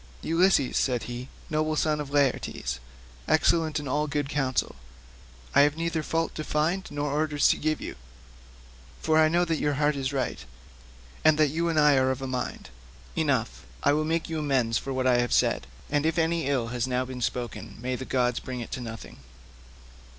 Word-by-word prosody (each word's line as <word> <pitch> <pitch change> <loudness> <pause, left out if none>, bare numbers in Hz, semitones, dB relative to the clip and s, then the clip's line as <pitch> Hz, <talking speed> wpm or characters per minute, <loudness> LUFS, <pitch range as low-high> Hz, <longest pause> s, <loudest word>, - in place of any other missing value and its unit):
"Ulysses," 165 -5 +3
said 125 -3 +1
he, 120 +1 -6 0.2
"noble 155 0 0
son 155 0 +1
of 145 - -6
Laertes, 135 - 0 0.5
excellent 160 -2 +2
in 145 - -6
all 150 +3 0
good 145 -1 -2
counsel, 135 -3 0 0.8
I 140 - +7
have 145 +1 +3
neither 165 -1 -1
fault 165 +1 -1
to 155 - -4
find 160 +6 0
nor 145 0 -2
orders 150 0 +2
to - - +3
give 155 0 0
you, - - -6 1.0
for 160 0 +3
I 155 - +6
know 175 +2 +3
your 155 -4 0
heart 150 +1 +2
is 135 -1 -2
right, 135 -2 -2 0.8
and 155 -1 +5
that 155 -2 +4
you 165 +4 0
and 160 -2 +2
I 150 -2 +5
are 130 0 +3
of 130 0 -2
a - - -2
mind. 125 - -4 0.4
Enough; - - 0 0.2
I 145 - +4
will 155 +1 +1
make 160 +1 -1
you 160 -1 -3
amends 130 -6 +1
for 135 - -6
what 130 -1 -1
I 125 -1 +4
have 120 0 0
said, - - +2 0.2
and 145 0 0
if 160 +1 0
any 165 -2 +1
ill 130 -5 0
has 120 +1 -1
now 125 0 0
been 130 -1 -7
spoken 115 -3 -4
may 125 +2 -2
the 130 - -5
gods 125 -2 0
bring 130 -1 -6
it 120 - -7
to 130 - -4
nothing." 115 -2 -8
145 Hz, 195 wpm, -27 LUFS, 130-155 Hz, 1.0 s, I